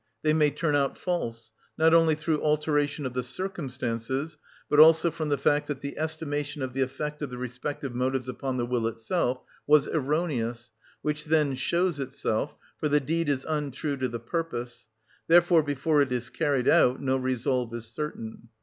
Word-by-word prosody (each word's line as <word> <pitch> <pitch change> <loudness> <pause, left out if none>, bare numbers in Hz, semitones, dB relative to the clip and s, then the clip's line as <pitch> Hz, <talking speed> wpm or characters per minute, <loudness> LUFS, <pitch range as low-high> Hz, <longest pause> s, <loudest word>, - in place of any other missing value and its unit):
They 155 0 +3
may 155 -1 +4
turn 150 0 0
out 140 -2 +1
false, 115 -11 -3 0.3
not 160 +1 +4
only 165 -2 +5
through 155 0 -1
alteration 150 -1 +1
of 130 - -3
the 125 - -1
circumstances, 130 -3 -3 0.3
but 150 - +3
also 160 +2 +7
from 155 -1 -3
the 145 - +2
fact 145 +1 +2
that 145 -2 -4
the 140 0 -5
estimation 150 -2 -3
of 130 -1 -4
the 135 - -1
effect 150 +3 -3
of 145 - -3
the 125 - -7
respective 125 +2 -5
motives 130 +1 -1
upon 130 +1 -3
the 120 - 0
will 120 -2 0
itself 125 +3 -1 0.2
was 150 -1 +5
erroneous, 130 -6 -1 0.3
which 150 0 -2
then 150 -3 +2
shows 170 +5 0
itself, 135 -1 -2 0.2
for 150 - 0
the 150 +1 +4
deed 160 +3 -1
is 135 -2 0
untrue 150 -1 -2
to 130 -1 0
the 120 -1 -5
purpose: 120 -3 -4 0.4
therefore 175 0 +6
before 145 +1 +1
it 140 -2 +1
is 120 -1 -2
carried 140 -5 0
out 125 +1 +5
no 135 -1 0
resolve 130 -1 -1
is 115 -1 -6
certain. 115 -3 -6
145 Hz, 175 wpm, -27 LUFS, 125-155 Hz, 0.4 s, also